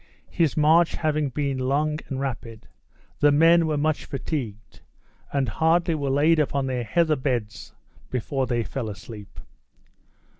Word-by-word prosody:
His 165 -4 +1
march 160 +3 +4
having 155 -2 0
been 140 0 -2
long 150 +4 0
and 135 - -4
rapid, 120 -4 -5 0.5
the 145 - +5
men 165 +3 +5
were 155 -1 0
much 155 +1 0
fatigued, 125 -6 -5 0.5
and 140 -2 0
hardly 165 +1 +2
were 145 -3 -2
laid 155 +4 +3
upon 140 -2 0
their 130 -2 -2
heather 155 +8 +2
beds 125 -6 -3 0.3
before 130 +2 -2
they 120 -1 0
fell 115 -1 -4
asleep. 105 +1 -10
140 Hz, 140 wpm, -24 LUFS, 125-155 Hz, 0.5 s, the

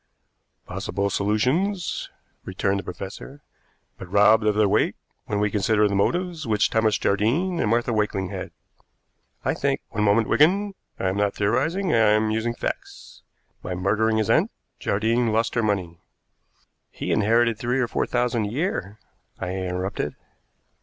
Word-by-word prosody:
"Possible 100 +1 -3
solutions," 130 - 0 0.3
returned 95 +1 -1
the - - -6
professor, 95 +10 -8 0.6
"but 90 -2 -9
robbed 105 +2 +5
of 105 -1 +2
their 105 -1 +4
weight 105 +2 +2 0.3
when 105 - -1
we 105 0 +1
consider 105 +1 +2
the 100 - -2
motives 170 - 0
which 105 -2 +2
Thomas 110 -1 +2
Jardine 140 - +1
and 105 - +1
Martha 120 +1 +1
Wakeling 105 -3 -1
had." - - -5 1.0
"I - - +2
think - - -1
" - - -51
"One 105 - -1
moment, 105 +2 +3
Wigan; 195 +7 +3 0.2
I 95 - -1
am 95 - -2
not 100 -1 +1
theorizing, 155 - 0
I - - +4
am 110 0 +3
using 115 +2 -1
facts. - - -6 0.4
By 90 - -4
murdering 110 +4 +1
his 110 -2 +1
aunt, - - +3 0.3
Jardine 115 +3 +1
lost 115 +1 +1
her 115 - +1
money 95 -6 -1 0.5
" - - -41
"He - - -4
inherited 115 +1 +2
three 125 +2 0
or 125 - +1
four - - -1
thousand 120 -3 0
a - - -3
year," 115 - -2 0.4
I 90 - -4
interrupted. 95 0 -3
110 Hz, 160 wpm, -24 LUFS, 100-120 Hz, 1.0 s, robbed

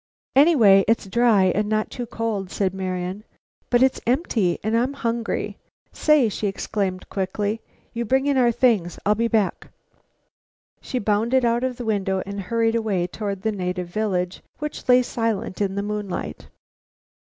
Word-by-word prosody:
"Anyway, 245 - +6
it's 225 -1 +2
dry, 220 0 +3
and 210 0 0
not 215 0 0
too 245 -1 -5
cold," 220 -5 -3
said 190 -1 -1
Marian. 185 +1 -4 0.5
"But 245 +1 +4
it's 265 - +2
empty, 235 - +1
and 220 +2 0
I'm 250 +4 +1
hungry. 235 -4 -3 0.3
Say!" 300 -6 +3
she 210 0 -2
exclaimed 195 -1 -3
quickly, 205 +3 -2 0.3
"you 235 - -2
bring 265 +4 +1
in 285 -1 +2
our 245 -2 +4
things; 220 -8 +1
I'll 210 - +4
be 230 +2 0
back." 220 -4 0 1.1
She 255 - -4
bounded 230 +4 +1
out 235 +1 +1
of 260 -1 -1
the 245 - -6
window 195 -3 0
and 200 0 -5
hurried 225 +3 0
away 215 -6 0
toward 200 +1 -5
the 220 - +1
native 180 -3 -3
village, 180 -3 -2 0.2
which 300 -3 -6
lay 250 0 +6
silent 225 -5 -2
in 195 -1 0
the 200 - -1
moonlight. 205 -2 -4
215 Hz, 160 wpm, -23 LUFS, 195-235 Hz, 1.1 s, Anyway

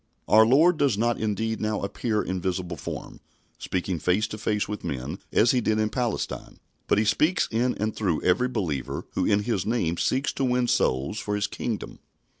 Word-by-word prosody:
Our 110 +1 +6
Lord 160 +7 +5
does 140 -8 +2
not 120 +2 +1
indeed 110 +1 -1
now 110 -1 -1
appear 105 +2 -1
in 95 -1 -3
visible 90 -1 -2
form, 75 - -7 0.4
speaking 90 -2 -2
face 90 +7 +2
to 110 - -6
face 105 -1 0
with 105 0 -5
men 70 +1 -4
as 110 +2 +4
He 125 - +2
did 110 -1 +1
in 110 0 +1
Palestine, 120 -3 -3 0.3
but - - +3
He 105 - +2
speaks 160 - +2
in 120 +2 +1
and 110 +1 -2
through 90 -7 -1
every 95 +8 +3
believer 90 - -3
who - - 0
in 105 0 +3
His 100 -5 0
name 95 -7 0
seeks 135 +9 0
to 135 - -2
win 125 -1 +2
souls 70 - +1
for 105 - -2
His 100 0 0
Kingdom. 115 -4 -4
110 Hz, 195 wpm, -26 LUFS, 95-120 Hz, 0.4 s, Our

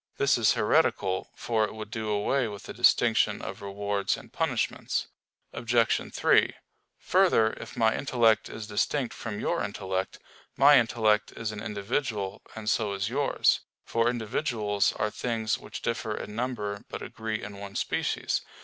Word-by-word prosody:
This 140 - +3
is 115 -3 +4
heretical; 105 -5 +1
for 115 -2 0
it 110 - -3
would 110 -1 -7
do 110 -1 -3
away 110 +5 +1
with 100 -2 -8
the - - -8
distinction - - +3
of 100 +2 -7
rewards 100 0 -1
and - - -14
punishments. - - -1 0.5
Obj. 115 -1 +1
3: - - +3 0.4
Further, 110 0 +3
if - - -9
my 110 -1 +3
intellect 120 -5 +2
is 110 - -6
distinct 115 +4 -1
from 110 -3 -5
your - - 0
intellect, 95 -2 -3 0.4
my 145 0 +8
intellect 110 -2 +1
is 115 -1 -4
an 105 -1 -7
individual, 105 -1 -2
and 110 -1 -7
so 110 -2 +1
is 100 +1 -2
yours; 140 +4 +2 0.3
for 115 +1 +2
individuals 110 -3 0
are 105 - -1
things 115 -2 -1
which - - -9
differ 115 -2 -2
in 105 - -6
number 110 -4 -3
but - - -6
agree 110 -1 -4
in 100 0 -8
one 100 -1 -8
species. - - -1
110 Hz, 155 wpm, -28 LUFS, 105-115 Hz, 0.5 s, my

